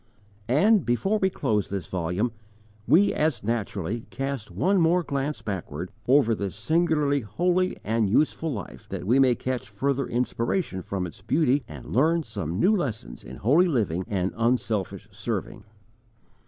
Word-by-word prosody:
And, 195 - +4
before 195 - +1
we 190 - +2
close 110 - -1
this 95 -4 -3
volume, 90 +7 -1 0.6
we 170 - +5
as 150 -8 0
naturally 110 -1 -2
cast 135 -4 -4
one 180 - +2
more 175 +2 +3
glance 140 0 -3
backward 95 -5 -5 0.2
over 130 -3 +5
this 100 -3 -3
singularly 150 +4 +2
holy 180 - 0
and 110 -1 +1
useful 155 +7 +1
life, 105 -8 -7
that - - -5
we 120 +7 +4
may 130 -3 +5
catch 125 -5 -4
further 135 +5 -1
inspiration 120 - -1
from 95 0 -3
its 90 +2 -10
beauty 135 +5 +2
and - - -8
learn 160 +5 +3
some 90 - -4
new 210 - +4
lessons 110 - -4
in 65 - -9
holy 150 - +4
living 100 - 0
and 95 -2 -1
unselfish 115 -4 -1
serving. - - -4
125 Hz, 150 wpm, -26 LUFS, 100-155 Hz, 0.6 s, we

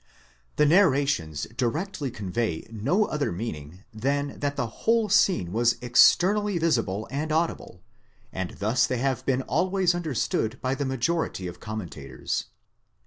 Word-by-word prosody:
The 150 - +4
narrations 140 - +2
directly 145 - -2
convey 100 -4 -3
no 140 - +1
other 150 -6 -2
meaning, 85 -3 -6
than 140 +6 -2
that 145 0 -1
the - - -1 0.2
whole 225 -1 +2
scene 180 - +3
was 120 +1 +3
externally 190 - +4
visible 115 - 0
and 150 +3 -2
audible, 155 - -2 0.5
and 95 -1 -3
thus 115 +4 +2
they 125 - -1
have 130 -1 -1
been 130 -1 +1
always 185 +5 +1
understood 135 -8 -1
by 130 0 -1
the 140 +1 -2
majority 130 - -1
of 90 -1 -7
commentators. 90 -11 -5
130 Hz, 135 wpm, -26 LUFS, 110-160 Hz, 0.5 s, The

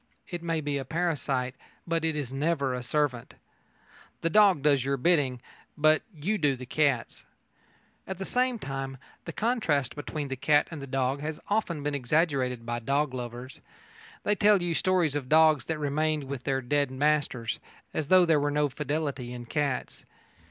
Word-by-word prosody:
It 175 -2 -5
may 165 -2 -1
be 145 -1 -2
a - - -3
parasite, 140 -5 -1 0.3
but 165 -1 -1
it 160 -1 0
is 135 -4 -4
never 140 -2 0
a 125 - -3
servant. 125 -1 -1 0.9
The 165 - 0
dog 200 -8 +5
does 140 -4 +4
your 140 +1 0
bidding, 135 -4 +2 0.4
but 155 +1 +4
you 190 +6 -2
do 145 -4 +2
the 130 0 -8
cat's. 140 -2 0 0.8
At 190 - -4
the 190 - -4
same 250 +1 +1
time, 135 -5 -5 0.3
the - - -4
contrast 215 - 0
between 145 -1 -5
the 135 - -2
cat 145 +3 +3
and 160 -3 -6
the 140 - -7
dog 135 +1 -1
has 155 +1 -4
often 180 -8 0
been 145 0 -1
exaggerated 130 -3 0
by 120 0 -2
dog 140 +3 0
lovers. 125 +1 -7 0.6
They 205 - +2
tell 205 -1 +4
you 175 -1 -1
stories 180 -3 +2
of 140 -3 -3
dogs 155 -2 +5
that 160 - -1
remained 150 +1 0
with 135 -2 -6
their 135 -1 0
dead 140 +2 +1
masters, 130 -4 0 0.3
as 155 - -2
though 185 +1 +6
there 160 -3 +4
were 145 0 +1
no 145 0 +1
fidelity 145 -3 -3
in 120 -1 -7
cats. 140 0 -2
145 Hz, 175 wpm, -28 LUFS, 135-160 Hz, 0.9 s, though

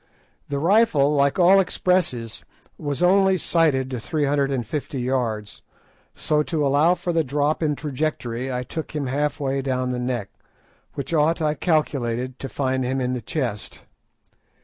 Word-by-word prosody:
The 140 - -2
rifle, 165 -4 +3
like 140 -1 +2
all 185 +2 +6
expresses, 175 - 0 0.3
was 145 +2 -3
only 190 +1 +4
sighted 150 -7 +1
to 125 - -3
three 150 +5 -1
hundred 140 -1 +1
and 125 -4 -1
fifty 140 +2 -4
yards, 120 -5 -2 0.5
so 150 -1 +1
to 150 -1 -1
allow 145 +6 +4
for 175 -1 -3
the 165 -1 +2
drop 145 +3 0
in 150 -2 +1
trajectory 135 -4 -3
I 125 0 -2
took 155 +4 -6
him 145 -2 -1
half 145 +4 -1
way 135 -1 -1
down 130 -1 -1
the 125 - -2
neck, 125 -5 -3 0.6
which 140 +4 -5
ought, 160 +2 +2
I 155 -2 +1
calculated, 130 -6 -1
to 135 - -5
find 130 -1 -1
him 130 +2 -1
in 125 0 -1
the 125 - -3
chest. 120 -5 -4
140 Hz, 165 wpm, -23 LUFS, 130-155 Hz, 0.6 s, all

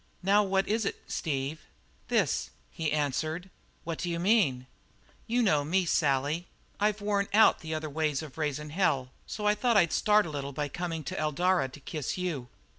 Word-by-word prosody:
"Now 200 +2 +5
what 195 -1 +1
is 220 +1 +1
it, 200 - -2
Steve?" 145 0 -2 0.5
"This," - - +1 0.2
he 160 -2 -2
answered. 155 +5 -1 0.3
"What 165 -1 -4
d'you 170 -1 -2
mean?" 170 - +3 0.6
"You 240 +2 +2
know 150 -9 +3
me, 180 +5 +1
Sally. 150 +2 +1 0.3
I've 210 0 +1
worn 200 -1 +1
out 220 - +6
the 160 -1 -4
other 155 0 -3
ways 155 0 -1
of 150 -4 -10
raising 150 -1 -3
hell, 140 -8 +1 0.2
so 210 - -5
I 210 - +5
thought 230 +1 +2
I'd 170 -5 +4
start 210 -1 +4
a 160 - -5
little 140 -1 -4
by 145 +1 -2
coming 165 0 -4
to - - -4
Eldara 155 0 +1
to 130 - -12
kiss 150 +2 -4
you." 165 -9 -3
160 Hz, 180 wpm, -29 LUFS, 145-195 Hz, 0.6 s, out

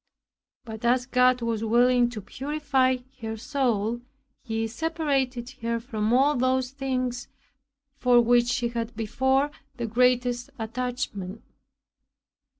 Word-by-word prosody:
But 220 -1 -8
as 245 +1 +2
God 250 -1 +3
was 225 -1 -1
willing 240 +2 +4
to 230 -3 -6
purify 270 +1 0 0.2
her 225 0 -4
soul, 240 -3 -1 0.4
He 225 -2 -2
separated 270 -2 -1
her 230 0 -1
from 225 -3 -2
all 275 +4 +4
those 255 0 +1
things 255 -3 -2 0.7
for 245 -1 +5
which 240 0 +4
she 240 0 0
had 235 0 -4
before 265 +6 +1 0.3
the 240 - -2
greatest 245 +1 +2
attachment. 225 -4 -4
245 Hz, 115 wpm, -26 LUFS, 230-260 Hz, 0.7 s, for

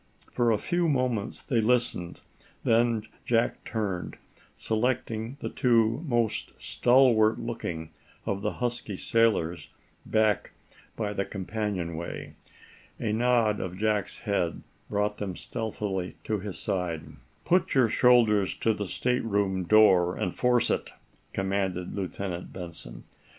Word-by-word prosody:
For 120 -1 +2
a 110 - +3
few 175 - 0
moments 125 -7 -1
they 120 -5 +1
listened. 110 -7 +1 0.4
Then 115 -1 +3 0.2
Jack 115 -1 +1
turned, 100 -6 -3 0.4
selecting 115 +1 -1
the - - -3
two 115 +1 +2
most 120 -4 -1
stalwart 120 -4 +4
looking 85 -9 -4 0.3
of 100 0 -2
the - - -1
husky 120 -5 -3
sailors 105 -8 +1 0.3
back 110 -2 +1 0.4
by 105 -2 -2
the 100 - 0
companionway. 95 -5 -4 0.7
A 105 - -1
nod 115 -2 +2
of 90 0 -4
Jack's 105 -1 0
head 100 -6 -1 0.3
brought 105 0 -1
them 95 -3 -3
stealthily 100 -5 -4
to 105 -1 -1
his 100 -1 -6
side. 85 -4 -2 0.4
"Put 180 -3 +2
your 130 -3 +5
shoulders 110 -4 +4
to 110 - +1
the 105 -2 -4
stateroom 100 -5 0
door, 90 -3 +5
and 90 - -2
force 125 -1 +2
it," - - -1 0.4
commanded 95 -2 -1
Lieutenant 95 -2 -4
Benson. 75 -10 -8
105 Hz, 120 wpm, -28 LUFS, 95-115 Hz, 0.7 s, your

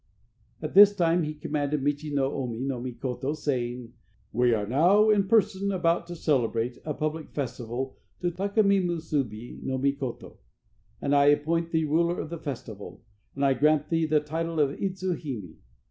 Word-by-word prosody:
At 155 - -4
this 205 +1 +8
time 175 -2 +2
he 155 -1 -3
commanded 145 -1 -2
Michi 145 +1 -1
no 140 -1 0
Omi 120 -4 -3
no 130 -2 -2
Mikoto, 130 +2 -3
saying: 125 -5 -3 0.4
"We 125 +2 +3
are 105 -3 +1
now 180 - +4
in 200 -2 +2
person 200 -2 +2
about 170 -2 +1
to 175 - -6
celebrate 120 -6 0
a 150 -2 -3
public 155 +1 -3
festival 125 -1 -4 0.3
to 175 -1 0
Taka 200 +5 +1
mi 200 -1 +4
Musubi 150 - -3
no 130 - -2
Mikoto, 140 -2 -3 0.7
and 140 - +2
I 140 0 +5
appoint 160 +3 +2
thee 160 -1 +1
ruler 170 +3 +1
of 160 - -5
the 170 - -5
festival, 115 -9 -7 0.3
and 140 0 0
I 135 - +4
grant 150 +3 +2
thee 165 -1 +1
the 155 -1 +3
title 165 +2 -3
of 140 -2 +3
Idzu 190 -1 -1
hime. 110 - -6
150 Hz, 170 wpm, -27 LUFS, 130-170 Hz, 0.7 s, this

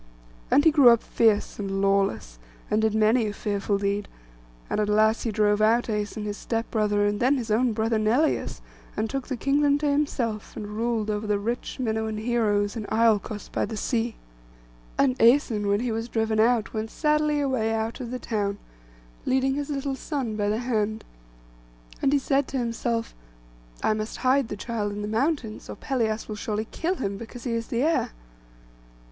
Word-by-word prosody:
And 290 - +4
he 320 - +7
grew 285 -5 +7
up 235 -1 +4
fierce 220 -3 +1
and 195 -1 -2
lawless, 195 - 0 0.3
and 215 - +3
did 220 -1 +1
many 220 +1 +3
a 205 - -3
fearful 200 0 -1
deed; 200 +1 -1 0.6
and - - -1
at 210 -1 +1
last 215 +2 +3
he 230 - 0
drove 210 0 +2
out 230 +3 +4
Æson 210 -1 -3
his 205 0 -4
step 225 0 -3
brother, 210 -2 +2
and 205 0 0
then 265 +3 +3
his 235 -3 -4
own 240 +3 +3
brother 220 0 0
Neleus, 240 +9 +1 0.4
and 215 - 0
took 270 +3 -4
the 260 - -3
kingdom 285 +2 +2
to 295 0 -1
himself, 250 -7 -1
and 205 - -5
ruled 225 -1 0
over 210 +1 -3
the 210 -1 +2
rich 230 +5 -3
Minuan 220 -2 -1
heroes, 215 -2 +1
in 215 -3 -5
Iolcos 220 -2 +1
by - - 0
the 220 - -4
sea. 235 0 -1 0.8
And 260 -2 +2
Æson, 230 -3 +4
when 200 +2 +2
he 245 -1 -1
was 225 +2 -3
driven 220 -1 0
out, 225 0 +2
went 220 0 -3
sadly 300 +2 +1
away 260 -6 0
out 225 +2 -2
of 245 -3 -5
the 255 - -3
town, 205 -5 -2 0.7
leading 265 +1 +2
his 285 +1 -3
little 280 -1 -2
son 265 -6 -3
by 205 -1 0
the 215 - +1
hand; 220 -3 -1 1.0
and 270 - +3
he 290 - +4
said 275 0 +1
to 270 - -3
himself, 230 -1 -2 0.7
'I - - +3
must 215 +1 -4
hide 260 0 +2
the 210 - -5
child 210 -2 -3
in 205 0 -5
the - - -3
mountains; 230 0 -1
or - - -5
Pelias 225 -5 -1
will 215 - -5
surely 215 +1 -3
kill 350 +3 -1
him, 200 - -3
because 230 +2 -9
he 245 - -2
is 230 0 -2
the 235 +2 0
heir. 320 - +1
225 Hz, 190 wpm, -26 LUFS, 210-255 Hz, 1.0 s, he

